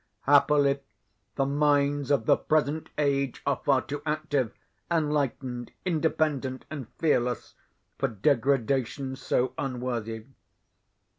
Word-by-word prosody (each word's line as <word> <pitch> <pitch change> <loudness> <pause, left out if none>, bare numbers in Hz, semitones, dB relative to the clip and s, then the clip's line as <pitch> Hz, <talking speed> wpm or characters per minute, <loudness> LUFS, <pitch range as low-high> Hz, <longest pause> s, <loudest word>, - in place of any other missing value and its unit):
Happily, 140 0 +4 0.6
the 135 - +1
minds 145 0 +2
of 140 -6 +2
the - - +6
present 155 0 0
age 140 -3 0
are 140 -2 0
far 135 -2 +3
too 145 +1 -5
active, 150 -5 -1 0.4
enlightened, 140 -6 -1
independent, 155 -6 0
and 140 -6 -5
fearless, 125 -6 0 0.5
for - - +2
degradation 130 +2 +1
so 130 -1 0
unworthy. 120 -4 -3
140 Hz, 100 wpm, -27 LUFS, 130-145 Hz, 0.6 s, the